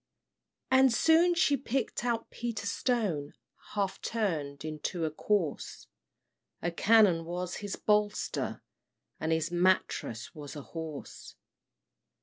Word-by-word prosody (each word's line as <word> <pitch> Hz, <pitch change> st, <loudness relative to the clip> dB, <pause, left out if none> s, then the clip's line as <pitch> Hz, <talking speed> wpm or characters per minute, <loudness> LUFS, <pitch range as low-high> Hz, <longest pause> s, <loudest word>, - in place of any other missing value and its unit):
And 260 Hz, 0 st, +6 dB
soon 330 Hz, +7 st, +4 dB
she 335 Hz, -4 st, +4 dB
picked 270 Hz, -3 st, -2 dB
out 235 Hz, -2 st, -1 dB
Peter 230 Hz, -3 st, -4 dB
Stone, 200 Hz, -, -1 dB, 0.4 s
Half 200 Hz, -2 st, -1 dB
turned 155 Hz, -10 st, -2 dB
into 155 Hz, +2 st, -3 dB
a 155 Hz, -, -1 dB
corse; 170 Hz, -1 st, -1 dB, 0.7 s
A 175 Hz, -, -1 dB
cannon 195 Hz, -3 st, +5 dB
was 175 Hz, +1 st, -4 dB
his 205 Hz, -1 st, -4 dB
bolster, 210 Hz, 0 st, 0 dB, 0.6 s
and 160 Hz, -, -1 dB
His 160 Hz, +1 st, 0 dB
mattrass 175 Hz, -10 st, +1 dB
was 145 Hz, -2 st, -9 dB
a 145 Hz, -, -7 dB
horse. 160 Hz, -3 st, -8 dB
190 Hz, 115 wpm, -30 LUFS, 160-230 Hz, 0.7 s, And